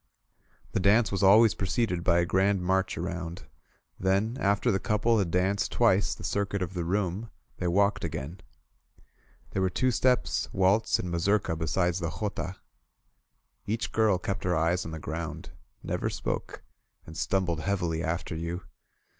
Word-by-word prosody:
The - - 0
dance 100 +2 +4
was 100 - -1
always 105 +3 +7
preceded 100 -3 -1
by 85 -1 +3
a 85 - +3
grand 95 +1 +2
march 95 +1 0
around; 85 0 -4 0.6
then, 100 +5 +1
after 100 +3 +2
the 95 - +1
couple 110 +3 +2
had 95 -4 0
danced 95 +3 +1
twice 105 -4 +3
the - - -11
circuit 100 -1 -1
of 90 - -5
the 90 -2 -2
room, 95 +4 -1 0.3
they 90 - -2
walked 100 +3 +2
again. 80 +2 -5 1.1
There 95 - -1
were 95 - +2
two 130 +8 +1
steps, 125 +1 +1
waltz 95 +4 +3
and 90 - -4
mazurka 90 +1 +1
beside 85 +3 0
the 85 -1 -2
jota. 100 -3 -3 1.1
Each 110 +3 -2
girl 110 -4 +3
kept 95 +1 -4
her 90 -1 +1
eyes 85 +3 +1
on 80 - -6
the 80 - -5
ground, 80 0 -5 0.3
never - - -2
spoke, - - -4 0.4
and 80 - -11
stumbled 90 -2 0
heavily 85 -3 -1
after 85 0 -2
you. 85 +2 -4
95 Hz, 155 wpm, -28 LUFS, 85-100 Hz, 1.1 s, always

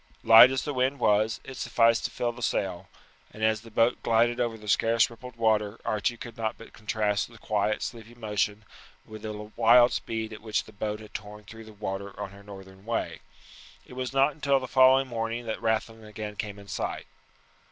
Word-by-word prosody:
Light 115 +2 +9
as 130 0 -1
the 145 - -3
wind 130 +2 0
was, 110 -2 +2
it 135 - -9
sufficed 115 -1 +2
to - - -1
fill 120 - -2
the 120 +1 -12
sail; 95 -4 -2 0.4
and 110 - -8
as 110 -1 +2
the 115 - -13
boat 115 +2 +2
glided 115 +1 +2
over 115 -2 -1
the 105 -1 -13
scarce 115 +3 +3
rippled 125 +1 -11
water 110 -2 +1
Archie 110 +3 -1
could 115 -1 -9
not 110 0 -2
but 115 - -14
contrast 105 -1 -1
the 115 - -15
quiet 105 0 -1
sleepy 115 0 -7
motion 105 -2 -2 0.4
with 110 -1 -10
the 110 - -5
wild 115 +3 +4
speed 110 -1 -3
at 105 - -10
which 110 -1 -1
the 110 - -16
boat 105 +1 -4
had 105 - -13
torn 105 0 -8
through 110 +2 -12
the 110 - -12
water 100 -1 -6
on 100 -2 -5
her 100 0 -14
northern 95 -1 -12
way. 115 +1 -3 0.7
It - - -14
was 130 0 -4
not 135 +2 +3
until 140 -2 +1
the 130 - -6
following 130 +1 +5
morning 115 0 -3
that 110 0 -4
Rathlin 110 0 -1
again 105 0 -7
came 105 -1 -5
in 100 0 -13
sight. - - -4
110 Hz, 205 wpm, -27 LUFS, 105-120 Hz, 0.7 s, Light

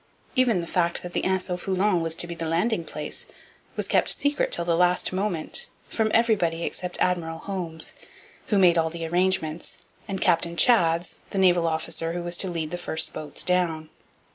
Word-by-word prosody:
Even 245 -8 +3
the - - -5
fact 170 0 0
that 175 0 -7
the - - -1
Anse 190 -1 +1
au 180 - 0
Foulon 190 0 +1
was 165 0 0
to - - 0
be 170 - -6
the 165 -1 -4
landing 175 +4 0
place 150 -1 -5 0.5
was - - -1
kept - - +2
secret 285 +1 +1
till 170 - +2
the 170 -1 +2
last 180 +1 +2
moment 195 - -2 0.2
from 220 -1 0
everybody 195 -8 +2
except 180 +1 -3
Admiral 165 -3 0
Holmes, 170 -3 -4 0.5
who 210 - +2
made 175 -3 +5
all 160 0 +1
the 165 0 -5
arrangements, 175 -2 0 0.3
and 195 -1 -3
Captain 170 0 +2
Chads, 170 -4 +3
the - - -5
naval 175 -3 +4
officer 165 +1 -1
who 175 0 -4
was 175 0 -1
to 190 - +2
lead 165 -3 -3
the 175 - -4
first 160 -2 -1
boats 150 -2 -3
down. 170 -4 0
175 Hz, 190 wpm, -25 LUFS, 165-190 Hz, 0.5 s, made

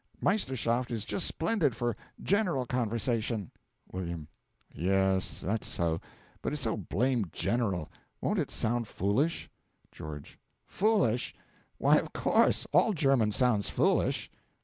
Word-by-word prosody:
Meisterschaft 130 - +1
is 110 -3 -3
just 180 - 0
splendid 165 - +1
for 120 -2 -1 0.3
general 185 - +2
conversation. 115 -4 -1 0.4
W. 85 -4 -4 0.5
Yes, 95 +2 +1
that's 105 +4 -1
so; 80 -1 0 0.4
but - - -2
it's 150 -2 -2
so 110 - +1
blamed 120 - 0
general! 95 -4 0 0.3
Won't - - 0
it - - -1
sound 120 0 -1
foolish? 125 - 0 0.4
GEO. 75 -1 -7 0.5
Foolish! 185 - +1 0.4
Why, - - +5
of - - -2
course; - - +3
all 220 - +5
German 135 - +3
sounds 115 -3 +2
foolish. - - +1
115 Hz, 120 wpm, -30 LUFS, 100-135 Hz, 0.5 s, Why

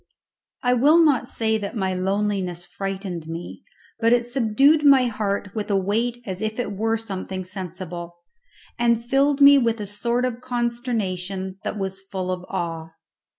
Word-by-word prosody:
I 245 0 +3
will 285 +7 +5
not 300 -7 +4
say 220 -1 0
that 205 +2 -5
my 190 -2 0
loneliness 190 -2 -1
frightened 190 -4 -5
me, 165 +2 -7 0.4
but 230 0 +3
it 240 0 +3
subdued 270 +5 +3
my 275 -3 +6
heart 205 -3 -2
with 215 -2 -4
a 200 - +2
weight 230 +5 0
as 190 -2 -5
if 220 0 -2
it 240 - -2
were 225 +3 0
something 190 -3 -5
sensible, 180 -2 -7 0.6
and 235 -1 +2
filled 275 +3 +2
me 280 0 +9
with 230 -2 +1
a 210 - -3
sort 235 +5 -1
of 245 -1 -3
consternation 215 -7 -2
that - - -3
was 195 -1 -4
full 190 -1 -4
of 180 -1 -4
awe. 165 -3 -4
210 Hz, 160 wpm, -23 LUFS, 190-240 Hz, 0.6 s, me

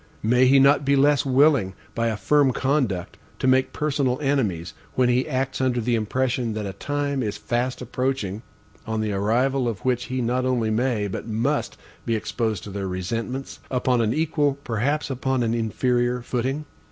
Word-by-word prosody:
May 125 +4 +4
he 135 +2 +6
not 140 +2 +5
be 140 0 +3
less 145 +1 +3
willing 130 -8 +3 0.2
by 115 0 0
a 110 -2 -1
firm 145 +1 +3
conduct, 130 - -1 0.2
to - - -3
make 130 0 +3
personal 140 -4 0
enemies, 110 - -1 0.2
when 125 -1 +3
he 125 +3 +2
acts 130 -1 -1
under 125 -2 +1
the 120 +1 0
impression 120 +1 0
that 105 -1 -3
a 95 - -4
time 145 +5 -2
is 105 -4 -2
fast 125 +1 -2
approaching, 125 -5 -2 0.5
on 110 -1 -1
the 110 -1 -1
arrival 120 +6 +1
of 110 -3 -4
which 125 -2 +1
he 130 0 -3
not 125 +1 0
only 120 -4 +1
MAY, 110 -2 0
but 100 - -5
MUST, 120 +7 -1 0.3
be 115 - 0
exposed 110 -3 -2
to 105 - -8
their 100 0 -3
resentments, 115 +8 -4
upon 125 -1 +1
an 110 -1 +1
equal, 150 -1 +1
perhaps 135 +6 -1
upon 130 -1 0
an 115 0 0
inferior, 120 +2 0
footing? 130 +5 -2
125 Hz, 175 wpm, -24 LUFS, 110-135 Hz, 0.5 s, he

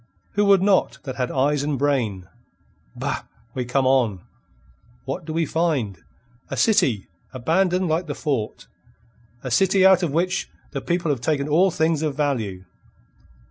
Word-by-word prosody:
Who 205 0 +1
would 195 -2 +5
not 195 -1 +2
that 130 -3 -6
had 125 -1 -1
eyes 140 +2 +1
and 145 -1 -1
brain? 120 -10 0 0.7
Bah! - - -3 0.3
we 125 -2 -3
come 130 +2 +1
on. 120 -8 +2 0.8
What 140 +5 -4
do 160 - -5
we 165 +1 0
find? 145 - -1 0.5
A - - -4
city, 130 - +2 0.3
abandoned 180 +8 +1
like 165 +2 0
the 145 - -4
fort; 135 -9 -3 0.8
a 130 - -4
city 190 +7 +4
out 190 -1 +6
of 175 - 0
which 180 +5 0 0.2
the 140 - -4
people 170 -2 0
have 130 -5 -2
taken 145 0 0
all 170 +6 +4
things 160 -2 +1
of 150 -3 -1
value. 110 -11 -2
150 Hz, 155 wpm, -23 LUFS, 130-175 Hz, 0.8 s, out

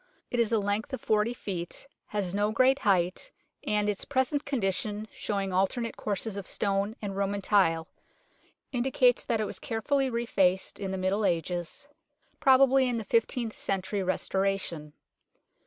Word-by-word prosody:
It 245 - 0
is 230 -2 +2
a 225 - +3
length 205 +4 -1
of 260 - -3
40 215 +1 +2
feet, 180 -3 -5 0.2
has 200 -4 -2
no 205 +1 +1
great 260 +4 +4
height, 190 - +1 0.3
and 210 0 +1
its 205 -2 -1
present 280 +1 0
condition, 210 -4 -1
showing 195 -2 -2
alternate 230 +6 0
courses 205 0 -2
of 200 - -5
stones 200 +1 0
and 195 -1 -3
Roman 200 +1 -1
tile, 165 -6 +3 0.8
indicates 250 -1 +2
that 230 -2 0
it 215 - 0
was - - -5
carefully 265 +4 0
refaced 195 -6 +1
in 195 -1 -3
the 190 - -3
Middle 190 +3 0
Ages 175 - -2 0.5
probably 265 0 +5
in 240 - -1
the 225 - -3
fifteenth 230 +2 0
century 195 +1 -1
restoration. 185 -4 -1
205 Hz, 150 wpm, -28 LUFS, 190-235 Hz, 0.8 s, probably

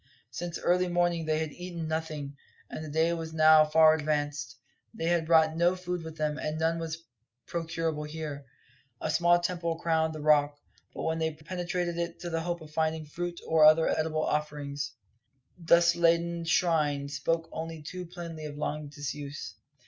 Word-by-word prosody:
Since 170 +7 -4
early 180 +1 +2
morning 175 -1 +1
they 155 0 +1
had 155 -1 -2
eaten 175 -1 -6
nothing, 155 -3 -4 0.4
and 155 - -5
the 155 - -7
day 160 +3 +2
was 165 -1 -5
now 155 0 +7
far 155 +1 +6
advanced; 145 -3 -2 0.4
they 165 - -3
had 170 -1 +1
brought 160 -1 +5
no 175 +2 +3
food 180 -1 -4
with 160 0 -9
them, 150 0 -1
and 155 +1 -3
none 165 +1 +1
was 165 0 -5 0.4
procurable 165 -2 -2
here. 150 -3 -6 0.5
A 155 - -1
small 175 +2 +4
temple 175 -2 -2
crowned 160 -1 0
the - - -6
Rock; 145 -1 +3 0.4
but - - -4
when 160 0 -1
they 160 0 0
penetrated 175 +1 -3
it 170 0 -4
in 175 - -4
the 165 0 -1
hope 175 0 -3
of 155 -1 -12
finding 160 0 -1
fruit 175 +3 -5
or 160 -1 +4
other 155 +1 +7
edible 155 0 0
offerings, 145 -2 -3 0.7
its 170 - -13
dustladen 170 0 +4
shrine 155 -5 +2
spoke 165 +4 -1
only 160 -1 -6
too 180 +3 -6
plainly 170 -3 -7
of 145 -1 -7
long 150 0 -3
disuse. 145 0 -6
160 Hz, 170 wpm, -29 LUFS, 150-170 Hz, 0.7 s, now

